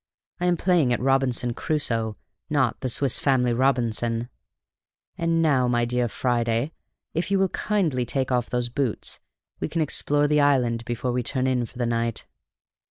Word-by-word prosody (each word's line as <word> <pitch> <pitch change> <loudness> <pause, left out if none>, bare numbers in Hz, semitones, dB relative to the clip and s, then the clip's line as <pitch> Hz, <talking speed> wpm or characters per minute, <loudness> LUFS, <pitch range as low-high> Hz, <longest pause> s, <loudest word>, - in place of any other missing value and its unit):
I 180 - 0
am 175 -1 +2
playing 170 -8 +2
at 120 - +1
'Robinson 130 -2 +1
Crusoe,' 115 -7 -1 0.3
not 140 -5 +1
'The 130 - -2
Swiss 130 +1 +1
Family 125 -3 +2
Robinson.' 120 -2 0 0.9
And 165 0 +1
now, 135 -5 +3
my 120 -1 +2
dear 125 0 0
Friday, 120 +3 0 0.4
if 165 +4 -1
you 200 - +2
will 190 0 +2
kindly 175 -14 0
take 130 +2 -2
off 125 -1 0
those 125 -1 -1
boots, 125 -2 -2 0.4
we - - -1
can 165 +1 -1
explore 145 0 +1
the 150 0 +3
island 125 -5 +2
before 120 +1 -2
we 125 +1 0
turn 130 +2 -1
in 125 -2 +1
for 120 - -16
the 120 - 0
night." 115 -1 -1
125 Hz, 165 wpm, -25 LUFS, 120-145 Hz, 0.9 s, now